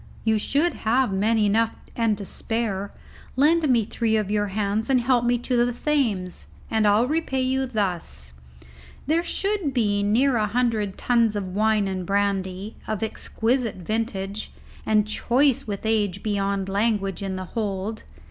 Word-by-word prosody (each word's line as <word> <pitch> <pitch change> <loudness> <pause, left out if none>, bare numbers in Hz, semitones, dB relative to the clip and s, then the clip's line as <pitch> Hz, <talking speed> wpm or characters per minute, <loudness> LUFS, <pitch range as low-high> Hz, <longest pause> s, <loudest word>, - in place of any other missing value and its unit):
"You 220 -1 +2 0.2
have 265 - +2
men 215 +4 +2
enough 220 +2 +2 0.2
and 225 -3 +1
to 200 - -6
spare. 205 -2 -3 0.4
Lend 305 +3 +3
me 235 -4 +3
three 220 0 0
of 210 -2 -1
your 205 -1 +1
hands 205 +2 -1
to 265 - +3
help 245 0 +2
me 240 0 +3
to 240 0 +1
the 245 - 0
Thames, 235 - -1 0.2
and 220 -1 +3
I'll 210 +4 +4
repay 270 -2 0
you 265 +1 0
thus; 180 - -2 0.7
there 320 +4 +2
should 385 -5 -1
be 205 -4 +2
near 235 +6 +3
a 215 -1 +1
hundred 220 -3 0
tons 235 -3 +2
of 190 -3 -3
wine 215 0 +2
and 190 -1 -3
brandy, 195 +1 -1
of 215 0 -2
exquisite 225 +2 -1
vintage, 200 +1 -3 0.4
and 215 -1 +3
choice 250 +4 +1
with 205 0 -4
age 205 -3 0
beyond 200 -2 -1
language 200 -1 0
in 195 -1 -3
the 185 0 -5
hold. 210 +1 -3
220 Hz, 155 wpm, -24 LUFS, 200-245 Hz, 0.7 s, I'll